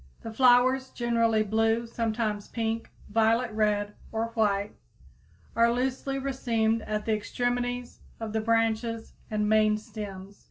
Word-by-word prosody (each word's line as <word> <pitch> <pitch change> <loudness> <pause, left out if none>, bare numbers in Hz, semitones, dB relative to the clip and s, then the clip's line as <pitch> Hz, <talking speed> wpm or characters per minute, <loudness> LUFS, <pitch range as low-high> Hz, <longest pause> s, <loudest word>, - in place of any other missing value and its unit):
The 225 - -6
flowers, 255 +2 +4
generally 230 -2 +1
blue, 225 +2 +1
sometimes 220 -2 -2
pink, 225 -1 -3 0.2
violet 225 +2 +2
red, 210 -1 0 0.2
or 225 +1 -1
white, 205 -3 0 0.8
are 235 0 +4
loosely 260 +2 -1
racemed 230 -5 0
at 210 0 -2
the 220 - +1
extremities 245 +3 -2 0.2
of 220 -1 -5
the 220 - 0
branches 225 0 0 0.2
and 210 -1 0
main 215 0 +4
stems. 205 -3 -8
225 Hz, 125 wpm, -28 LUFS, 215-240 Hz, 0.8 s, flowers